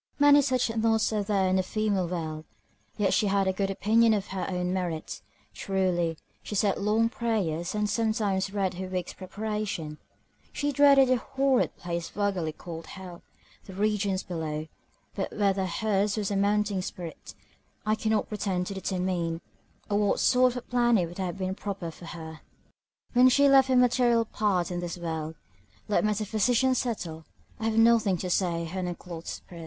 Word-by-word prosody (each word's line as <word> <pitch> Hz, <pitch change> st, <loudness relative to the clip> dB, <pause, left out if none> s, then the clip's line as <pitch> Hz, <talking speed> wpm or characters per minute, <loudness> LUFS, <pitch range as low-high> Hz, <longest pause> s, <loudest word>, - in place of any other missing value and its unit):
Many 290 Hz, 0 st, +7 dB
such 255 Hz, -4 st, 0 dB
noughts 225 Hz, -1 st, +2 dB
are 210 Hz, -, +1 dB
there 200 Hz, -2 st, +1 dB
in 185 Hz, 0 st, +2 dB
the -, -, +3 dB
female 200 Hz, -1 st, -1 dB
world! 160 Hz, -3 st, -4 dB, 0.5 s
yet 205 Hz, -3 st, +2 dB
she 210 Hz, -, +2 dB
had 195 Hz, 0 st, +2 dB
a 190 Hz, -, +2 dB
good 195 Hz, +1 st, -1 dB
opinion 220 Hz, +3 st, +3 dB
of 205 Hz, -1 st, -3 dB
her 190 Hz, -1 st, -3 dB
own 180 Hz, -1 st, -1 dB
merit, 175 Hz, -4 st, -3 dB, 0.3 s
truly, 180 Hz, -4 st, 0 dB, 0.2 s
she 210 Hz, -, -6 dB
said 200 Hz, 0 st, +2 dB
long 215 Hz, +3 st, +2 dB
prayers, 215 Hz, -9 st, -2 dB
and 210 Hz, 0 st, +1 dB
sometimes 210 Hz, -4 st, 0 dB
read 195 Hz, -2 st, -1 dB
her 185 Hz, +1 st, -5 dB
Week's 185 Hz, -1 st, -4 dB
Preparation: 200 Hz, -6 st, -4 dB, 0.5 s
she 290 Hz, 0 st, -1 dB
dreaded 275 Hz, -1 st, +6 dB
that 255 Hz, -1 st, +3 dB
horrid 270 Hz, +1 st, +1 dB
place 170 Hz, -1 st, -4 dB
vulgarly 195 Hz, -6 st, -1 dB
called 165 Hz, +1 st, -9 dB
hell, 185 Hz, -2 st, -10 dB, 0.4 s
the 190 Hz, -, -10 dB
regions 205 Hz, -2 st, 0 dB
below; 160 Hz, -3 st, -4 dB, 0.5 s
but 195 Hz, -, -3 dB
whether 195 Hz, -2 st, +1 dB
her's 205 Hz, +2 st, 0 dB
was 205 Hz, -1 st, -1 dB
a -, -, 0 dB
mounting 205 Hz, 0 st, +1 dB
spirit, 175 Hz, -3 st, -8 dB, 0.5 s
I 215 Hz, -, +2 dB
cannot 220 Hz, -1 st, 0 dB
pretend 195 Hz, -4 st, -2 dB
to 200 Hz, -, -5 dB
determine; 180 Hz, -3 st, -2 dB, 0.5 s
or 205 Hz, 0 st, +1 dB
what 205 Hz, -1 st, +1 dB
sort 250 Hz, -1 st, +4 dB
of -, -, -6 dB
a -, -, -3 dB
planet 240 Hz, -8 st, +2 dB
would 175 Hz, -, -10 dB
have 185 Hz, -1 st, -3 dB
been 190 Hz, -1 st, -2 dB
proper 195 Hz, -4 st, -5 dB
for 175 Hz, -, -13 dB
her, 160 Hz, -2 st, -8 dB, 0.7 s
when 250 Hz, +1 st, +7 dB
she 280 Hz, +3 st, +5 dB
left 270 Hz, -1 st, +6 dB
her 260 Hz, -, +2 dB
material 245 Hz, -2 st, +4 dB
part 200 Hz, -5 st, 0 dB
in 175 Hz, -, -2 dB
this 175 Hz, 0 st, -4 dB
world, 160 Hz, -2 st, -4 dB, 0.5 s
let 210 Hz, -, +2 dB
metaphysicians 220 Hz, +4 st, +2 dB
settle; 175 Hz, -10 st, -4 dB, 0.4 s
I 220 Hz, -, -3 dB
have 225 Hz, 0 st, 0 dB
nothing 225 Hz, -4 st, +4 dB
to 180 Hz, +1 st, -4 dB
say 170 Hz, -3 st, +1 dB
to 165 Hz, -, -6 dB
her 190 Hz, -, -3 dB
unclothed 175 Hz, -2 st, -6 dB
spirit. 175 Hz, -, -8 dB
195 Hz, 175 wpm, -27 LUFS, 180-220 Hz, 0.7 s, Many